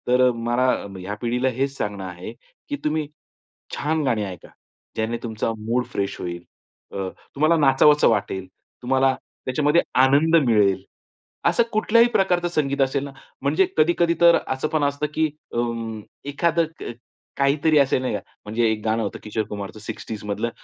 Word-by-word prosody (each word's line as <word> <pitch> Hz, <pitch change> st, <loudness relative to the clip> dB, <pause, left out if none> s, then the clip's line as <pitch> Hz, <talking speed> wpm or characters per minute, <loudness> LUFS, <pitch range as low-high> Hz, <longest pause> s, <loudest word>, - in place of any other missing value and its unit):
तर 125 Hz, +1 st, +4 dB
अ, 125 Hz, 0 st, +5 dB
मला 120 Hz, 0 st, 0 dB
म 95 Hz, -, -9 dB
ह्या 95 Hz, +3 st, -5 dB
पिढीला 125 Hz, +2 st, +1 dB
हेच 135 Hz, +1 st, -1 dB
सांगणं 100 Hz, -2 st, -3 dB
आहे, 90 Hz, -1 st, -7 dB, 0.4 s
की 290 Hz, -, -1 dB
तुम्ही 155 Hz, 0 st, 0 dB, 0.7 s
छान 155 Hz, +2 st, 0 dB
गाणी 115 Hz, -6 st, +1 dB
ऐका. 95 Hz, -2 st, -9 dB, 0.5 s
ज्याने 110 Hz, +2 st, -1 dB
तुमचा 115 Hz, -1 st, -2 dB
मूड 115 Hz, +3 st, -1 dB
फ्रेश 100 Hz, 0 st, -2 dB
होईल. 85 Hz, -1 st, -5 dB, 0.5 s
अ, 95 Hz, -1 st, -3 dB, 0.3 s
तुम्हाला 155 Hz, +4 st, +3 dB
नाचावसं 145 Hz, +1 st, +5 dB
वाटेल, 100 Hz, -4 st, -1 dB, 0.3 s
तुम्हाला 130 Hz, +1 st, +2 dB, 0.3 s
त्याच्यामध्ये 150 Hz, +5 st, +3 dB, 0.2 s
आनंद 145 Hz, +5 st, +4 dB
मिळेल. 100 Hz, -5 st, +3 dB, 0.6 s
असं 235 Hz, -, +4 dB
कुठल्याही 230 Hz, +2 st, +4 dB
प्रकारचं 180 Hz, -2 st, +2 dB
संगीत 140 Hz, -5 st, 0 dB
असेल 135 Hz, +1 st, +1 dB
ना 140 Hz, -, -7 dB, 0.3 s
म्हणजे 150 Hz, +7 st, +3 dB
कधी-कधी 170 Hz, +2 st, +3 dB
तर 170 Hz, 0 st, +7 dB
असं 130 Hz, +3 st, -1 dB
पण 155 Hz, -2 st, 0 dB
असतं 145 Hz, +1 st, 0 dB
की 160 Hz, 0 st, +1 dB, 0.2 s
उम्म, 115 Hz, -2 st, -3 dB, 0.3 s
एखादं 165 Hz, +3 st, +1 dB
क -, -, -5 dB, 0.5 s
काहीतरी 145 Hz, +3 st, +3 dB
असेल, 135 Hz, -2 st, +2 dB
नाही 130 Hz, -, -2 dB
का -, -, -2 dB, 0.3 s
म्हणजे 110 Hz, +3 st, -1 dB
एक 110 Hz, -1 st, -3 dB
गाणं 110 Hz, +1 st, +1 dB
होतं 100 Hz, -, -4 dB
किशोर 110 Hz, +1 st, -2 dB
कुमारचं 100 Hz, +1 st, -6 dB
60s 105 Hz, 0 st, -7 dB
मधलं 105 Hz, +3 st, -2 dB
130 Hz, 160 wpm, -23 LUFS, 110-150 Hz, 0.7 s, तर